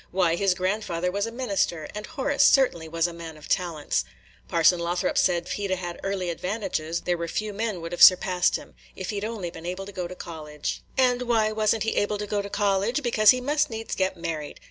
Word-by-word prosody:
Why, 175 Hz, -2 st, +2 dB
his 190 Hz, 0 st, +2 dB
grandfather 180 Hz, -2 st, -1 dB
was 200 Hz, +3 st, -1 dB
a -, -, -5 dB
minister, 200 Hz, -10 st, -1 dB
and 210 Hz, 0 st, -6 dB
Horace 285 Hz, -2 st, -1 dB
certainly 210 Hz, -, +4 dB
was 165 Hz, 0 st, 0 dB
a 175 Hz, -, -2 dB
man 165 Hz, -2 st, -9 dB
of 150 Hz, -, -12 dB
talents. 170 Hz, -5 st, 0 dB, 0.4 s
Parson 170 Hz, +1 st, +4 dB
Lothrop 175 Hz, +1 st, -1 dB
said, 175 Hz, -2 st, +2 dB
if 185 Hz, -, -7 dB
he 200 Hz, +2 st, -2 dB
'd -, -, -11 dB
'a' 190 Hz, -, +2 dB
had 175 Hz, -1 st, -6 dB
early 190 Hz, -3 st, -1 dB
advantages, 170 Hz, -3 st, -3 dB
there 175 Hz, -1 st, -1 dB
were 170 Hz, -, -2 dB
few 210 Hz, +5 st, -3 dB
men 210 Hz, -3 st, -2 dB
would 165 Hz, -, -6 dB
have 175 Hz, -, -4 dB
surpassed 180 Hz, -1 st, +6 dB
him. -, -, -7 dB, 0.2 s
If 185 Hz, +1 st, -4 dB
he 205 Hz, -, -3 dB
'd 205 Hz, -, -4 dB
only 215 Hz, -6 st, -4 dB
been 165 Hz, 0 st, -9 dB
able 185 Hz, +2 st, -4 dB
to 200 Hz, -, -9 dB
go 180 Hz, -2 st, -4 dB
to 185 Hz, -, -9 dB
college." 155 Hz, -4 st, -6 dB, 0.2 s
"And 250 Hz, -1 st, +3 dB
why 225 Hz, -3 st, +2 dB
was 215 Hz, 0 st, +2 dB
n't 220 Hz, -, -2 dB
he 225 Hz, -, -1 dB
able 205 Hz, 0 st, +1 dB
to 210 Hz, -, -4 dB
go 205 Hz, 0 st, -1 dB
to 200 Hz, -, -7 dB
college? 205 Hz, +7 st, +1 dB
Because 215 Hz, -3 st, +4 dB
he 255 Hz, 0 st, +6 dB
must 295 Hz, +3 st, +1 dB
needs 225 Hz, -1 st, -5 dB
get 190 Hz, -1 st, 0 dB
married. 165 Hz, -3 st, -5 dB
190 Hz, 235 wpm, -26 LUFS, 170-215 Hz, 0.4 s, surpassed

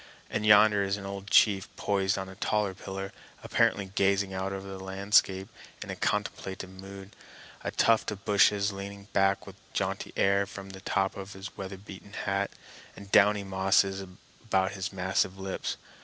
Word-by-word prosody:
And 105 Hz, 0 st, -1 dB
yonder 105 Hz, -1 st, +7 dB
is 95 Hz, +1 st, 0 dB
an 100 Hz, -, -8 dB
old 100 Hz, 0 st, -6 dB
chief 100 Hz, -2 st, +4 dB
poised 95 Hz, -1 st, 0 dB
on 95 Hz, -1 st, -4 dB
a 95 Hz, -, -9 dB
taller 100 Hz, 0 st, 0 dB
pillar, 95 Hz, +1 st, -6 dB, 0.3 s
apparently 100 Hz, -, +2 dB
gazing 100 Hz, -1 st, +2 dB
out 95 Hz, +1 st, -2 dB
over 95 Hz, 0 st, -5 dB
the 95 Hz, -1 st, -7 dB
landscape 95 Hz, 0 st, +2 dB, 0.4 s
in -, -, -5 dB
contemplative 95 Hz, -1 st, -2 dB
mood, 95 Hz, +1 st, -11 dB, 0.5 s
a -, -, -1 dB
tuft 115 Hz, -1 st, +3 dB
of 100 Hz, -2 st, -7 dB
bushes 100 Hz, 0 st, +4 dB
leaning 100 Hz, +1 st, -8 dB
back 95 Hz, 0 st, +2 dB
with 95 Hz, 0 st, -11 dB
a 95 Hz, -, -28 dB
jaunty -, -, -2 dB
air 100 Hz, 0 st, +3 dB
from 100 Hz, 0 st, -9 dB
the 95 Hz, 0 st, -10 dB
top 95 Hz, 0 st, 0 dB
of 100 Hz, +1 st, -7 dB
his 95 Hz, +2 st, -9 dB
weatherbeaten 100 Hz, +1 st, -9 dB
hat, 100 Hz, -1 st, -1 dB, 0.5 s
and 100 Hz, 0 st, -12 dB
downy 105 Hz, 0 st, +5 dB
mosses 95 Hz, 0 st, +2 dB
about 95 Hz, +1 st, -3 dB
his 95 Hz, -1 st, -4 dB
massive 95 Hz, 0 st, 0 dB
lips. 95 Hz, 0 st, -4 dB
95 Hz, 165 wpm, -29 LUFS, 95-100 Hz, 0.5 s, yonder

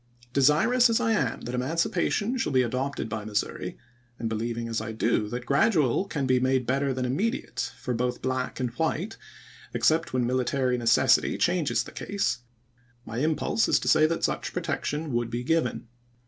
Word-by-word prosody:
Deshous 155 Hz, -, +4 dB
as 230 Hz, -, +2 dB
I 225 Hz, -2 st, +1 dB
am 135 Hz, -, 0 dB
that 120 Hz, -, -6 dB
emancipation 165 Hz, -, 0 dB
shall 230 Hz, -11 st, -1 dB
be 130 Hz, -1 st, +4 dB
adopted 130 Hz, +2 st, -2 dB
by 110 Hz, -1 st, -4 dB
Missouri, 105 Hz, 0 st, -3 dB, 0.4 s
and 115 Hz, -1 st, -3 dB
beheving 115 Hz, +1 st, -2 dB
as 115 Hz, -1 st, -2 dB
I 110 Hz, +1 st, -5 dB
do 110 Hz, -1 st, 0 dB
that 120 Hz, +2 st, -5 dB
gradual 150 Hz, -, +2 dB
can 150 Hz, -8 st, -2 dB
be 130 Hz, -1 st, +3 dB
made 130 Hz, 0 st, +1 dB
better 135 Hz, +2 st, +1 dB
than 130 Hz, -1 st, -2 dB
immediate 200 Hz, -, -2 dB
for 125 Hz, -, -3 dB
both 125 Hz, +1 st, -1 dB
black 130 Hz, 0 st, -2 dB
and 125 Hz, -2 st, -1 dB
white, 170 Hz, +7 st, -1 dB, 0.6 s
except 160 Hz, +1 st, +2 dB
when 125 Hz, -1 st, +1 dB
military 130 Hz, +1 st, +1 dB
necessity 115 Hz, -1 st, +3 dB
changes 160 Hz, -10 st, +1 dB
the -, -, -11 dB
case, 165 Hz, -12 st, -2 dB, 0.7 s
my 115 Hz, +2 st, -4 dB
impulse 155 Hz, -, +1 dB
is -, -, +5 dB
to -, -, -4 dB
say 155 Hz, 0 st, +5 dB
that 165 Hz, -, -2 dB
such -, -, -1 dB
protection 150 Hz, -1 st, -2 dB
would 120 Hz, -1 st, 0 dB
be 120 Hz, +1 st, -3 dB
given. 140 Hz, -5 st, 0 dB
130 Hz, 175 wpm, -27 LUFS, 120-160 Hz, 0.7 s, is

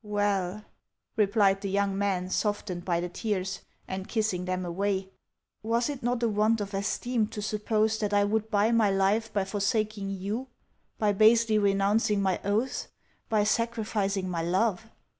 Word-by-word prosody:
" -, -, -48 dB, 0.2 s
Well," 200 Hz, 0 st, 0 dB, 0.5 s
replied 200 Hz, -2 st, +3 dB
the 200 Hz, -, -3 dB
young 200 Hz, 0 st, 0 dB
man, 190 Hz, -2 st, -1 dB
softened 205 Hz, -4 st, -1 dB
by 175 Hz, -2 st, 0 dB
her 175 Hz, -, -2 dB
tears, 190 Hz, 0 st, -3 dB, 0.3 s
and 190 Hz, 0 st, -5 dB
kissing 215 Hz, -6 st, -1 dB
them 185 Hz, 0 st, -2 dB
away, 190 Hz, +2 st, -2 dB, 0.2 s
" -, -, -59 dB
was 230 Hz, +4 st, 0 dB
it 280 Hz, -, -7 dB
not 245 Hz, 0 st, -1 dB
a -, -, +4 dB
want 215 Hz, +1 st, +2 dB
of 200 Hz, 0 st, -5 dB
esteem 215 Hz, +3 st, -1 dB
to 210 Hz, -, -7 dB
suppose 215 Hz, +1 st, 0 dB
that 210 Hz, -2 st, -1 dB
I 205 Hz, 0 st, +4 dB
would 215 Hz, +2 st, 0 dB
buy 210 Hz, +1 st, +2 dB
my 225 Hz, -3 st, +4 dB
life 200 Hz, +3 st, +1 dB
by 200 Hz, -3 st, 0 dB
forsaking 205 Hz, 0 st, -1 dB
you, 200 Hz, +7 st, -3 dB, 0.5 s
by 210 Hz, -1 st, +2 dB
basely 220 Hz, +1 st, +5 dB
renouncing 200 Hz, +1 st, +2 dB
my 190 Hz, -2 st, +1 dB
oaths, 220 Hz, +6 st, -1 dB, 0.4 s
by 215 Hz, -2 st, +3 dB
sacrificing 210 Hz, -3 st, 0 dB
my 175 Hz, -2 st, -2 dB
love?" 195 Hz, +5 st, 0 dB
205 Hz, 165 wpm, -28 LUFS, 195-220 Hz, 0.5 s, basely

